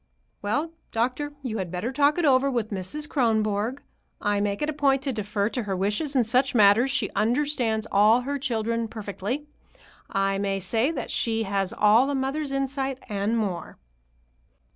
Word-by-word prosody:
"Well, 290 +11 -1 0.2
doctor, 255 +6 -1
you 225 -4 -3
had 185 -2 -3
better 180 +8 -3
talk 285 +3 +3
it 345 - +1
over 275 -1 +4
with 235 -5 -2
Mrs. 200 +11 -4
Kronborg. 220 -1 0 0.4
I 205 -1 0
make 205 +4 -1
it 300 - 0
a - - -7
point 275 -2 +2
to 270 -2 -1
defer 205 -1 -1
to 245 - -2
her 200 -3 -3
wishes 210 - -1
in 255 - +4
such 250 +4 +1
matters. 215 +4 +5
She 270 - 0
understands 240 -2 0
all 215 +4 +5
her 280 +3 -3
children 230 -3 -1
perfectly. 215 +5 -4 0.6
I 195 -1 0
may 195 -1 -1
say 225 +8 +1
that 325 - -4
she 225 -1 0
has 195 -2 -1
all 220 +6 +4
a 285 - 0
mother's 275 +2 -2
insight, 275 -1 -2
and 205 +2 0
more." 195 -6 -3
230 Hz, 170 wpm, -25 LUFS, 205-275 Hz, 0.6 s, matters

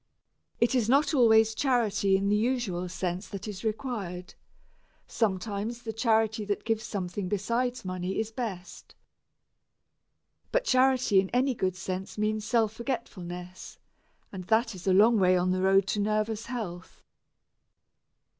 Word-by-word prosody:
It 235 +3 +2
is 235 -4 +1
not 285 +5 +3
always 225 -4 +5
charity 220 -7 +2
in 195 +1 -1
the 205 - +3
usual 210 -6 -1
sense 185 +1 -3
that 200 +1 -7
is 200 -3 -7
required; 210 -6 -4 0.7
sometimes 215 +2 -2
the 225 - -4
charity 220 -1 +1
that 205 0 -2
gives 225 -1 0
something 185 -1 -4
besides 235 +4 -1
money 185 +1 -3
is 220 0 -2
best. 220 -7 -7 1.6
But - - +2
charity 255 -5 +3
in 190 0 0
any 255 +2 +1
good 185 -5 -1
sense 185 +2 -5
means 215 0 -1
self 225 -3 +1
forgetfulness, 185 -7 -6 0.5
and 185 -2 -7
that 225 +3 +2
is 185 0 -9
a - - +4
long 215 +4 +5
way 185 -1 +4
on 180 +1 +1
the 185 0 0
road 195 0 +4
to 210 - 0
nervous 215 +2 -1
health. 195 -8 -7
210 Hz, 140 wpm, -28 LUFS, 185-235 Hz, 1.6 s, always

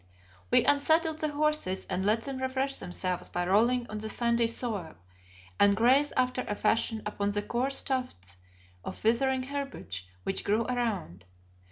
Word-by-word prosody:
We - - +4
unsaddled 315 +2 +3
the 310 - 0
horses 300 -10 0
and 185 0 -2
let 215 +3 +2
them 270 -2 -5
refresh 260 +1 -1
themselves 180 0 -3
by 175 0 -2
rolling 235 +6 +3
on 215 - -5
the 220 +1 -5
sandy 235 0 +2
soil, 220 -8 -3 0.6
and 200 0 +5
graze 260 +6 +4
after 255 0 +1
a 205 - -2
fashion 225 0 0
upon 205 -1 -2
the 205 0 -1
coarse 255 +5 0
tufts 170 - -4 0.5
of - - -8
withering 255 +4 +2
herbage 265 - -5 0.2
which 195 - -2
grew 215 +3 +1
around. 210 - -3
235 Hz, 155 wpm, -29 LUFS, 200-265 Hz, 0.6 s, and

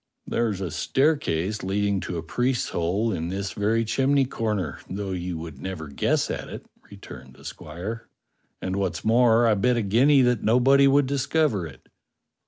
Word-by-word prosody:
^" - - -55 0.3
"There's 110 -5 0
a 90 -4 -3
staircase 105 - 0
leading 100 +1 0
to 90 - -5
a 80 - -4
priest's 125 +8 -1
hole 100 +7 -1
in 80 -2 -3
this 100 +1 -3
very 110 +3 0
chimney 135 +4 +2
corner, 105 - -3
though 95 +1 -4
you 90 -2 -4
would 80 -4 -9
never 90 -5 -6
guess 70 - 0
at - - -5
it," - - -8 0.2
returned - - -12
the - - -17
squire. 110 +7 -7 0.6
"And, 95 +1 -2
what's 95 -2 -2
more, 115 +1 +4
I 115 - +4
bet 120 +4 +1
a 115 - 0
guinea 130 +7 +4
that 125 -3 +2
nobody 135 +4 +4
would 140 +1 +4
discover 140 - 0
it." - - -15
105 Hz, 175 wpm, -25 LUFS, 95-125 Hz, 0.6 s, more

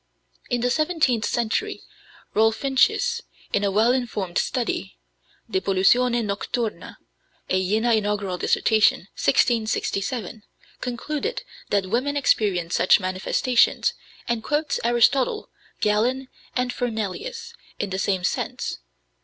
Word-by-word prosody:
In 245 -1 0
the 245 +1 +1
seventeenth 305 -7 +1
century, 230 -2 -1 0.5
Rolfincius, 270 - +2 0.3
in 200 - +2
a 200 - +2
well 215 +5 +3
informed 220 -8 -1
study - - -2 0.5
(De 190 - -1
Pollutione 235 +6 +3
Nocturna, 205 -1 -3 0.6
a 185 0 +2
Jena 220 +3 +2
Inaugural 205 -4 -1
Dissertation, 220 -1 +3
1667), 220 -2 0 0.4
concluded 295 - -3 0.3
that 200 -2 +1
women 280 +5 0
experience 195 -10 +1
such 185 - +5
manifestations, 185 +6 +1 0.3
and 235 -2 -1
quotes 295 +1 0
Aristotle, 240 +3 +2 0.3
Galen, 245 +5 +1 0.3
and 250 -1 0
Fernelius, 245 - -4 0.2
in 200 - -3
the 190 - -2
same 190 -2 0
sense. - - -2
225 Hz, 105 wpm, -24 LUFS, 200-255 Hz, 0.6 s, such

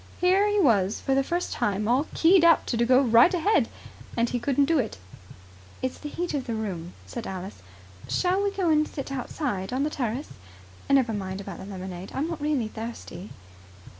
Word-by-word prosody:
Here 380 +3 +4
he 415 0 +2
was 210 - +3
for 270 - 0
the 270 0 +3
first 345 +5 -2
time 210 +1 -1
all 255 +6 +2
keyed 345 +1 +5
up 335 -1 +5
to 235 -1 +1
go 255 +1 +6
right 235 +6 +6
ahead, 365 +4 +2 0.5
and 235 0 +3
he 245 - -2
couldn't 280 +3 +2
do 325 0 +2
it. 225 - -2 0.9
"It's 260 - -2
the 295 - -6
heat 345 +2 -3
of 275 -3 -2
the 230 - -2
room," 185 -6 -4
said 235 - -6
Alice. 190 +1 -7 0.5
"Shall 370 +2 +1
we 405 - +1
go 380 -4 0
and 305 0 +3
sit 275 -1 -6
outside 250 -7 -3
on 260 +2 0
the 300 - -1
terrace? 255 +1 -3 0.6
Never 265 -5 +3
mind 190 -2 -4
about 195 -3 -7
the - - -8
lemonade. 185 -2 -7
I'm 285 +4 -1
not 335 -3 -5
really 290 -7 0
thirsty." 220 -4 -7
255 Hz, 195 wpm, -26 LUFS, 210-310 Hz, 0.9 s, go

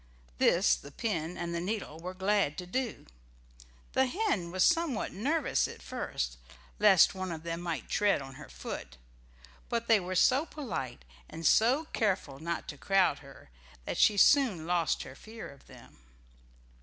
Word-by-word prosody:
This - - +4
the 140 - -11
pin 170 -2 -3
and 170 0 -4
the 170 - -1
needle 185 -5 -4
were 180 +2 -7
glad 195 -5 +1
to 180 - -5
do. 240 +5 -3 0.9
The 265 0 +3
hen 255 - -1
was 185 +1 +1
somewhat 330 -9 +1
nervous 290 +10 0
at - - -11
first, - - -4 0.4
lest 205 -4 +6
one 185 -1 -4
of 160 -1 -6
them 170 0 -4
might 165 -8 -4
tread 205 -1 +2
on 135 -1 -9
her 145 +2 -11
foot, - - -7 0.7
but 235 -1 -1
they 225 -2 +5
were 185 0 -4
so 255 +9 +4
polite, 135 - -5 0.2
and 165 - -7
so 255 - +4
careful 185 -10 -1
not 170 +2 -4
to 145 - -8
crowd 190 -7 +2
her, 135 - -15 0.3
that - - -3
she 210 - +5
soon 220 - +4
lost 170 -1 0
her 130 - -10
fear 220 +10 -10
of 140 -1 -16
them. - - -16
185 Hz, 165 wpm, -30 LUFS, 160-225 Hz, 0.9 s, lest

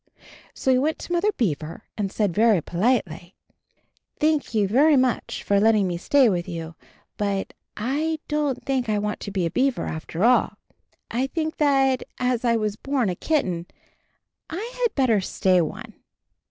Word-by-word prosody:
So 265 - +1
he 255 - +4
went 310 +4 0
to - - -9
Mother 390 +5 +2
Beaver 165 - -2
and 200 -3 -2
said 205 -5 0
very 220 -1 +4
politely, 175 - -1 0.8
"Thank 305 -5 +1
you 205 -2 +3
very 280 +8 +4
much 255 -2 0
for 200 0 +2
letting 215 -2 +3
me 175 - -2
stay 275 +6 +4
with 180 -3 -1
you 165 -1 -6 0.2
— - - -36
but 200 -1 -1 0.2
I 295 +8 -1
don't 295 -3 -1
think 260 -4 -1
I 210 - +1
want 210 0 -2
to - - -6
be 190 -3 -1
a 165 - -2
beaver, 265 0 0
after 160 +3 -4
all. 245 +2 +3 0.5
I 255 +3 0
think 315 +2 -3
that, 270 -3 +3 0.2
as 250 -1 0
I 235 -1 +3
was 215 -2 -1
born 270 -5 -1
a 180 - -2
kitten, 180 - -1 0.8
I 425 +9 -5
had 475 - +1
better 240 -7 +3
stay 185 -1 +2
one." 155 - -5
230 Hz, 170 wpm, -24 LUFS, 195-275 Hz, 0.8 s, he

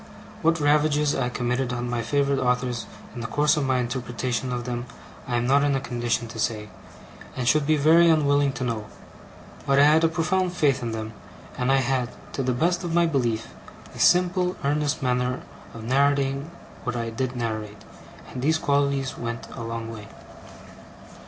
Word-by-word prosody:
What 165 +1 +2
ravages 150 0 +3
I 125 -2 0
committed 125 +1 -1
on 120 0 -3
my 120 -1 -1
favourite 140 +3 +1
authors 125 -3 0 0.3
in 120 - -6
the 115 - -3
course 150 +4 +2
of 150 -2 0
my 130 -1 +2
interpretation 125 0 -2
of 125 -1 -2
them, 120 0 -4 0.4
I 125 - -1
am 120 - 0
not 140 +3 +4
in 145 -1 +2
a - - +1
condition 120 -1 -2
to 115 - -8
say, 110 -2 -2 0.7
and 125 -2 -2
should 145 +3 +3
be 155 0 +3
very 165 +4 +6
unwilling 145 -3 +3
to 130 - -4
know; 115 -4 -3 0.8
but 140 0 +3
I 140 - +7
had 155 +2 +5
a - - +6
profound 175 +2 0
faith 145 -6 +2
in 120 -1 -3
them, 110 0 -5 0.4
and 125 +1 0
I 135 - +5
had, 125 -1 0 0.2
to - - -2
the 130 -1 0
best 175 +8 +1
of 170 -1 -2
my 170 0 +4
belief, 120 -8 -1 0.4
a - - -11
simple, 180 0 +3
earnest 145 0 0
manner 125 0 0 0.3
of 115 - -9
narrating 140 +3 +1 0.3
what 125 0 -3
I 115 -1 -3
did 130 +2 -3
narrate; 110 -3 -4 0.5
and 125 - -5
these 160 +4 +2
qualities 140 -2 0
went 115 -1 -5
a - - -7
long 115 0 -5
way. 105 -2 -9
130 Hz, 185 wpm, -25 LUFS, 120-145 Hz, 0.8 s, I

